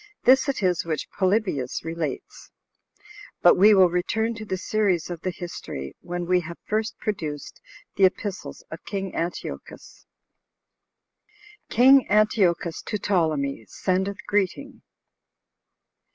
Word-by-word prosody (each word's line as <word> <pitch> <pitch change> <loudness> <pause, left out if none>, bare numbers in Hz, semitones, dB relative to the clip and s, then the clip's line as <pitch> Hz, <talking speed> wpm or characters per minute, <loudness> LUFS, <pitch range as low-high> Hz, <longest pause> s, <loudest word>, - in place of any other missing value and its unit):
This 265 +3 +5
it 265 -6 -2
is 180 -2 +1
which 160 -2 -3
Polybius 185 - -1
relates. 170 - -5 0.9
But 175 - +8
we 210 +3 +6
will 185 -3 +5
return 220 +6 0
to 220 -1 -8
the 190 -2 -3
series 190 -3 0
of 170 -2 -6
the 185 - -2
history, 170 - -7
when 175 0 -4
we 180 +1 +3
have 170 0 -8
first 220 +1 -2
produced 155 -9 -5 0.4
the 195 - +6
epistles 200 +1 -3
of - - -8
king 195 -2 -4
Antiochus. 170 +1 -6 1.6
King 265 +2 +6
Antiochus 195 -5 +2
To 210 - -3
Ptolemy, 155 - -1
Sendeth 190 +2 -1
Greeting. 205 +8 -2
185 Hz, 120 wpm, -24 LUFS, 170-215 Hz, 1.6 s, But